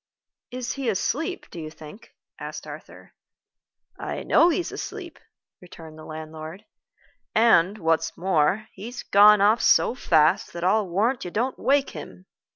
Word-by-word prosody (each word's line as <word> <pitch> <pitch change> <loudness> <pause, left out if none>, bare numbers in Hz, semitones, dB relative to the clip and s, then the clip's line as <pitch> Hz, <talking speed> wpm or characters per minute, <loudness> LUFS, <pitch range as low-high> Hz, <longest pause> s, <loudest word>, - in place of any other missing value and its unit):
"Is 250 0 -5
he 270 -4 -3
asleep, 290 - -2
do 170 - -8
you 155 -1 -6
think?" 155 +6 -14 0.2
asked - - -7
Arthur. - - -12 0.9
"I - - -5
know 340 - +4
he's 350 +1 -2
asleep," - - -8 0.4
returned 165 -3 -13
the 155 - -11
landlord; 155 +3 -9 0.7
"and, 215 -4 +4
what's 160 -3 -1
more, 185 +4 +1
he's 235 +6 -8
gone 205 +1 +6
off 215 +3 +4
so - - +4
fast 160 -11 +2
that 170 - -6
I'll 200 +2 +2
warrant 220 +9 0
you 180 - -5
don't 245 +8 -2
wake 280 0 +1
him. 90 0 -10
195 Hz, 145 wpm, -24 LUFS, 160-235 Hz, 0.9 s, gone